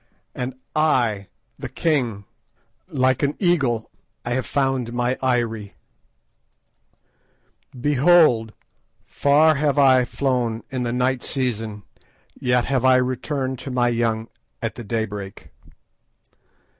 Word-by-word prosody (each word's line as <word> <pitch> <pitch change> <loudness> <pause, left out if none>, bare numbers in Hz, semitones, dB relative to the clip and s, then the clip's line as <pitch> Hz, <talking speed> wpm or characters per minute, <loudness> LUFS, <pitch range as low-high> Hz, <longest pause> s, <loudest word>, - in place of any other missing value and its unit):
"And 125 +1 -4 0.2
I—! 120 -10 +1 0.3
the - - -6
king—like 130 -1 -2
an 145 0 0
eagle 140 - +1 0.3
I 120 - -3
have 125 +1 -1
found 135 -4 -1
my 125 +1 0
eyrie. 115 -5 -1 2.0
"Behold! 145 -4 +4 0.5
far 150 +3 +3
have 145 -1 0
I 130 -3 +5
flown 120 -5 -1
in 130 -2 -2
the 120 -1 -1
night 125 +1 0
season, 110 -6 -3 0.5
yet 125 -1 0
have 130 -3 0
I 130 0 +6
returned 130 +1 -1
to - - -7
my 125 -1 +1
young 115 -1 -1 0.3
at 110 -2 -3
the 120 - -8
daybreak. 105 -6 -5
125 Hz, 105 wpm, -22 LUFS, 115-135 Hz, 2.0 s, I